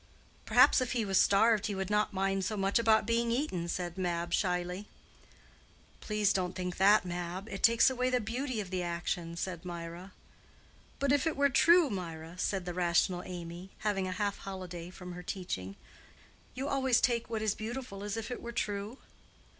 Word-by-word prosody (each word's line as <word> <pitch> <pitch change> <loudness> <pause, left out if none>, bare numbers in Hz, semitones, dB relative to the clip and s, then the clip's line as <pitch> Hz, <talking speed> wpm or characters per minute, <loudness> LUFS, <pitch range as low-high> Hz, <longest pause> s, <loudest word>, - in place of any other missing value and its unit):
"Perhaps - - +6
if 255 - -1
he 235 -3 0
was 195 -2 +4
starved 220 +1 +4
he 205 - -3
would 190 +1 -3
not 210 0 +2
mind 195 0 0
so 215 +2 -2
much 195 +3 +2
about 220 -2 +4
being 230 +1 +1
eaten," 230 - -1
said 175 +1 -3
Mab, 170 -1 -1
shyly. 180 +2 -1 1.1
"Please 210 -1 +1
don't 180 -1 -1
think 180 -1 -4
that, 200 +1 +5
Mab; 180 +2 -4
it 195 - -6
takes 230 0 +6
away 255 -1 +1
the 250 -1 +2
beauty 245 +2 -3
of 195 -3 -5
the 185 -1 -1
action," 170 -1 -3
said 180 -1 -4
Mirah. 175 +1 -7 0.9
"But 280 -1 +1
if 285 +2 +3
it 320 - -1
were 280 0 +4
true, 335 +2 +5
Mirah?" 170 -2 -6
said 190 -1 -1
the 175 - -4
rational 175 +1 +2
Amy, 175 0 -7
having 200 -3 0
a - - -3
half 200 +1 -2
holiday 180 -3 -7
from 180 0 -9
her 180 0 -7
teaching; 135 - -5 0.8
"you 265 +2 -3
always 265 -3 +3
take 235 -2 +1
what 220 -2 -2
is 215 -2 +2
beautiful 220 -3 -6
as 205 +1 -3
if 225 +2 -5
it 245 - -5
were 235 - -6
true." 205 +1 -3
195 Hz, 185 wpm, -31 LUFS, 180-230 Hz, 1.1 s, Perhaps